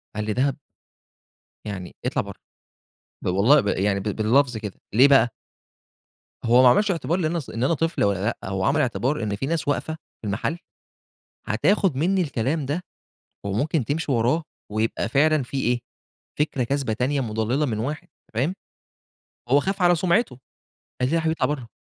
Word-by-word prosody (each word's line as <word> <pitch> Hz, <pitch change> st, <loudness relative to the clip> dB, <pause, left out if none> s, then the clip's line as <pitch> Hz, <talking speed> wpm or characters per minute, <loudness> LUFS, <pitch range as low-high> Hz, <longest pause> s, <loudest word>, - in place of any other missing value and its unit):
قال 105 Hz, 0 st, -2 dB
لي: 105 Hz, -, -1 dB
"دهب؟" 135 Hz, +4 st, +1 dB, 1.1 s
يعني 95 Hz, -4 st, -6 dB
اطلع -, -, +1 dB
برّه، -, -, -10 dB, 0.8 s
ب -, -, -5 dB
والله 105 Hz, +11 st, +5 dB
ب 105 Hz, -, -4 dB
يعني 100 Hz, 0 st, +1 dB
ب -, -, -6 dB
باللفظ 115 Hz, +5 st, +2 dB
كده، 105 Hz, -3 st, -7 dB
ليه 125 Hz, +6 st, +7 dB
بقى؟ 135 Hz, -4 st, +5 dB, 1.1 s
هو 120 Hz, +2 st, +6 dB
ما 125 Hz, -, +8 dB
عملش 205 Hz, +11 st, +3 dB
اعتبار 165 Hz, 0 st, -1 dB
لإن 160 Hz, -2 st, 0 dB
أنا 170 Hz, -, -1 dB
ص 145 Hz, -, -9 dB
إن 115 Hz, -, -3 dB
أنا 135 Hz, -, +3 dB
طفل 165 Hz, -3 st, 0 dB
والّا 100 Hz, -2 st, +1 dB
لأ، 100 Hz, -, -1 dB
هو 95 Hz, -1 st, -2 dB
عمل 145 Hz, +6 st, +2 dB
اعتبار 130 Hz, +1 st, 0 dB
إن 105 Hz, -1 st, -1 dB
في 110 Hz, -, -3 dB
ناس 160 Hz, 0 st, -2 dB
واقفة 150 Hz, +2 st, -1 dB, 0.3 s
في 110 Hz, -, -5 dB
المحل 110 Hz, -, -2 dB, 0.9 s
هتاخد 180 Hz, -, +2 dB
منّي 185 Hz, +6 st, +2 dB
الكلام 140 Hz, 0 st, -1 dB
ده 150 Hz, +6 st, -2 dB, 0.6 s
وممكن 120 Hz, -, 0 dB
تمشي 145 Hz, +4 st, -1 dB
وراه 125 Hz, +7 st, +2 dB, 0.3 s
ويبقى 110 Hz, +2 st, -1 dB
فعلًا 150 Hz, +3 st, +3 dB
في 130 Hz, +3 st, -6 dB
إيه 120 Hz, 0 st, +1 dB, 0.6 s
فكرة 145 Hz, -3 st, 0 dB
كاذبة 135 Hz, -2 st, -1 dB
تانية 130 Hz, +5 st, 0 dB
مضللة 115 Hz, +5 st, 0 dB
من 110 Hz, -5 st, -2 dB
واحد، 140 Hz, +8 st, -4 dB, 0.2 s
أنت -, -, -33 dB
فاهم؟ 135 Hz, -, 0 dB, 0.9 s
هو 140 Hz, +3 st, +5 dB
خاف 195 Hz, +4 st, -2 dB
على 175 Hz, 0 st, +6 dB
سمعته. 175 Hz, -, +1 dB, 0.6 s
قال 125 Hz, -, +2 dB
لي: -, -, -3 dB
"لا -, -, +1 dB
يا -, -, +2 dB
حبيبي 160 Hz, 0 st, 0 dB
اطلع -, -, +4 dB
برّه." 125 Hz, -5 st, -10 dB
130 Hz, 180 wpm, -24 LUFS, 110-155 Hz, 1.1 s, ما